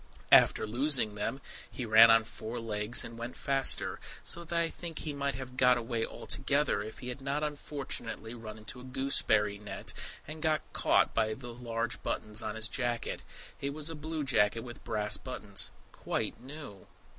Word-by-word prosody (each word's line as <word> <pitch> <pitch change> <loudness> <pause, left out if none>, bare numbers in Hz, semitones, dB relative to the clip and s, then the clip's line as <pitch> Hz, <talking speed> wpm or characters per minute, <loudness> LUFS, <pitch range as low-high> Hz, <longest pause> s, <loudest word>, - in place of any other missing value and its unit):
After - - +7
losing 120 -1 +2
them, 105 +6 -3 0.3
he 125 - -5
ran 110 +1 +9
on 115 0 +7
four 115 +1 -6
legs 110 0 +1
and 115 0 -9
went 120 +1 -5
faster, 135 -1 +1 0.2
so 170 - -1
that 170 0 -1
I 165 - +2
think 165 -1 -7
he 150 - -3
might 140 -1 -1
have 130 -1 -7
got 125 -1 +6
away 115 -1 -1
altogether 140 -4 +1
if 110 +1 -7
he 125 - -6
had 125 +2 -6
not 140 +2 -1
unfortunately 140 -6 -4
run 110 -2 -8
into 110 +3 -7
a - - -11
gooseberry 110 -6 +2
net, 105 -2 -5 0.3
and 155 +1 -7
got 155 -1 +2
caught - - +3
by 110 0 +1
the 120 -1 -8
large 115 -1 -3
buttons 105 +1 -3
on 110 -1 -3
his 110 0 -1
jacket. 120 -2 -1 0.4
It 140 +1 -2
was 155 +1 -1
a - - -5
blue 155 0 -3
jacket 115 -4 +3
with 120 0 -9
brass 105 -2 +1
buttons, 105 -6 -1 0.2
quite - - -3
new. 135 -8 -9
120 Hz, 180 wpm, -32 LUFS, 110-140 Hz, 0.4 s, ran